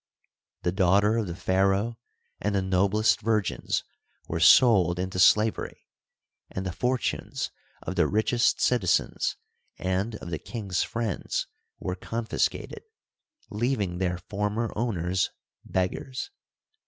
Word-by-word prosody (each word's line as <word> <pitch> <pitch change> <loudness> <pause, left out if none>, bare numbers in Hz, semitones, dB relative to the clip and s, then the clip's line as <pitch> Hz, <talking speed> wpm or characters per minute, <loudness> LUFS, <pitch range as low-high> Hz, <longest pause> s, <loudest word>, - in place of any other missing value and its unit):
The 90 - +1
daughter 100 +4 +3
of 110 -3 -1
the 85 - -5
pharaoh 95 +4 +1 0.4
and 100 +1 -1
the 95 - +2
noblest 100 +4 +2
virgins 110 -4 0 0.4
were 85 - -2
sold 90 - +6
into 95 0 -3
slavery, 105 +4 +3 0.6
and 95 - -5
the 95 - -2
fortunes 125 +6 -2 0.3
of - - -4
the - - +4
richest 120 +4 +2
citizens 100 -9 +1 0.4
and 95 +5 -1
of 85 - -8
the 80 - -2
king's 100 -7 -3
friends 115 -4 -2 0.3
were 90 - -3
confis 115 +4 -1
cated, - - -9 0.7
leaving 105 -5 -1
their 90 -2 0
former 105 +5 -2
owners 95 -5 0 0.3
beggars. 125 - -3
100 Hz, 115 wpm, -27 LUFS, 90-115 Hz, 0.7 s, sold